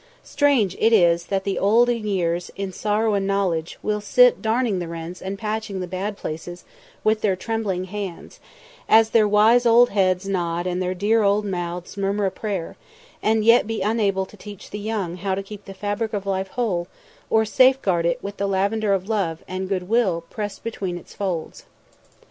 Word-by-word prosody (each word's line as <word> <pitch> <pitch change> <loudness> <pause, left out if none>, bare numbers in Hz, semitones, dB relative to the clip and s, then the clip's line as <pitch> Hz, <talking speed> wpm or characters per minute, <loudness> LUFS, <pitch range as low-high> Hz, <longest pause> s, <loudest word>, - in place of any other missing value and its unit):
Strange 275 - +2
it 225 - +4
is 170 -5 +4
that 195 -1 -1
the 195 -1 -2
old 225 +5 +4
in 230 -3 -1
years, 175 -3 -1
in 195 -1 -4
sorrow 210 +3 0
and 195 -1 0
knowledge, 180 -5 -1
will 210 0 -1
sit - - +4
darning 225 -3 0
the 175 - -4
rents 165 +2 -7
and 195 +1 -4
patching 215 -2 -3
the 180 - -3
bad 195 +3 -4
places 175 +2 -6 0.4
with 215 0 +2
their 200 -3 +2
trembling 200 -2 -2
hands, 190 -2 -7 0.5
as 225 0 +6
their 220 -2 +4
wise 215 +4 +5
old 240 +1 +5
heads 190 -1 +1
nod 175 -2 -1
and 180 0 -1
their 185 0 -1
dear 215 +4 +2
old 205 +1 +2
mouths 175 -1 -4
murmur 200 +1 0
a 190 - 0
prayer, 195 -6 -4 0.5
and 220 0 +1
yet 230 -1 +5
be 225 -2 -3
unable 200 -3 +1
to 200 - -16
teach 205 -2 -11
the 210 - -5
young 205 -5 -3
how 190 +1 -1
to 195 - -4
keep 205 0 -11
the 195 - -9
fabric 205 +3 -3
of 200 -2 -3
life 190 -1 -1
whole, 190 -5 -2 0.4
or 220 0 +3
safeguard 220 -7 +3
it 170 0 -1
with 200 0 -6
the 200 - -1
lavender 200 +2 +1
of 190 0 -4
love 190 -7 -1
and 185 0 -4
good 185 -2 -2
will 205 -6 +2
pressed 205 -2 -5
between 195 -6 -4
its 175 - -13
folds. 180 -5 -4
200 Hz, 190 wpm, -23 LUFS, 185-215 Hz, 0.5 s, as